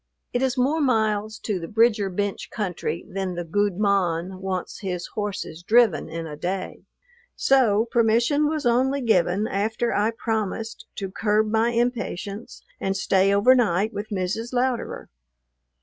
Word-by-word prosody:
It 245 - 0
is 265 0 0
more 285 +6 +2
miles 220 -4 +1
to 205 -4 -1
the 165 - -6
Bridger 215 -1 +3
Bench 200 +2 -3
country 175 -5 -3
than 190 -1 -3
the 175 - -3
"gude 200 +3 0
mon" 190 -3 0
wants 190 -2 -4
his 180 -3 -4
horses 205 -6 -4
driven 220 -1 +3
in 165 +1 -5
a 150 -2 -7
day; 185 +4 -4 0.5
so 230 -5 +3
permission 235 +6 +2
was 310 -2 -2
only 260 +4 +2
given 195 -3 +2
after 220 +4 -1
I 210 +2 +2
promised 225 -1 -3
to 195 -2 -5
curb 215 +1 +1
my 225 +1 +3
impatience 230 -3 -3 0.2
and 195 0 -1
stay 195 0 +3
overnight 215 -1 +3
with 210 +1 -5
Mrs. 210 +5 -3
Louderer. 250 -1 -1
210 Hz, 145 wpm, -24 LUFS, 190-235 Hz, 0.5 s, Bridger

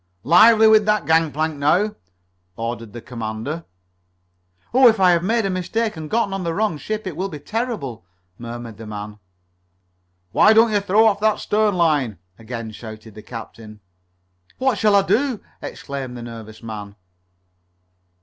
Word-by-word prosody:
"Lively 220 - +7
with 215 -1 +5
that 210 0 +2
gangplank 160 -1 +1
now!" 185 +9 +2 0.6
ordered 115 -1 -5
the 120 +1 -9
commander. 115 +7 -5 1.1
"Oh, 260 0 +7
if 225 -3 +4
I 185 -1 +6
have 170 -1 +3
made 225 +2 +1
a - - 0
mistake 210 +4 -2
and 155 -1 -7
gotten 220 -4 0
on 195 -1 -3
the 165 -1 -2
wrong 205 -7 0
ship 215 +4 -4
it 185 -5 -5
will 190 +4 -3
be 150 - -7
terrible," 205 - -4 0.4
murmured 120 -2 -8
the 110 0 -9
man. 105 0 -7 1.1
"Why 215 - +6
don't 225 +1 +5
you 205 - +3
throw 200 +3 +3
off 205 -2 +3
that 215 0 +2
stern 210 -1 +1
line?" 150 - +1 0.2
again 115 0 -6
shouted 110 0 -10
the 105 - -11
captain. 110 -1 -10 0.8
"What 260 -5 +1
shall 210 -2 +4
I 200 - +5
do?" 250 +2 +1 0.2
exclaimed 135 -3 -6
the 120 - -7
nervous 115 -2 -10
man. 105 -2 -7
165 Hz, 160 wpm, -21 LUFS, -, 1.1 s, Lively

